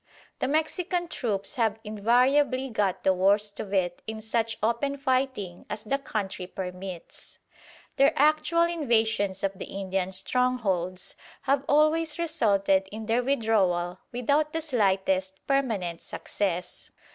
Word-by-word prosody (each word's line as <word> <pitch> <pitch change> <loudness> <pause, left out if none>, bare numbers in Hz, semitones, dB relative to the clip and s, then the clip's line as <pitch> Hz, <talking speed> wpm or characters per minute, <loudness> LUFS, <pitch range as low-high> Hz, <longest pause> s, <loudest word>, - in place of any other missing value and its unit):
The - - 0
Mexican 345 +4 0
troops 210 0 -2
have 220 -3 +1
invariably 255 +5 +2
got 205 -4 0
the 190 - +4
worst 200 +2 +2
of 200 - -5
it 180 -3 0
in 220 0 -4
such 225 +1 -1
open 255 +5 0
fighting 260 -9 -1
as 215 - -4
the 275 +5 -1
country 195 -8 -4
permits. 180 -1 -7 0.6
Their 275 +1 +6
actual 305 +3 +3
invasions 220 - +1
of 195 - +1
the - - -4
Indian 190 -1 -3
strongholds 190 -4 -1 0.3
have 275 0 +2
always 310 +2 +3
resulted 200 - +2
in 220 +1 -6
their 230 +2 +2
withdrawal 195 -9 +1
without 285 +5 +1
the 325 - -1
slightest 190 -8 +1
permanent 220 -12 0
success. 180 -3 -4
220 Hz, 125 wpm, -27 LUFS, 190-275 Hz, 0.6 s, Their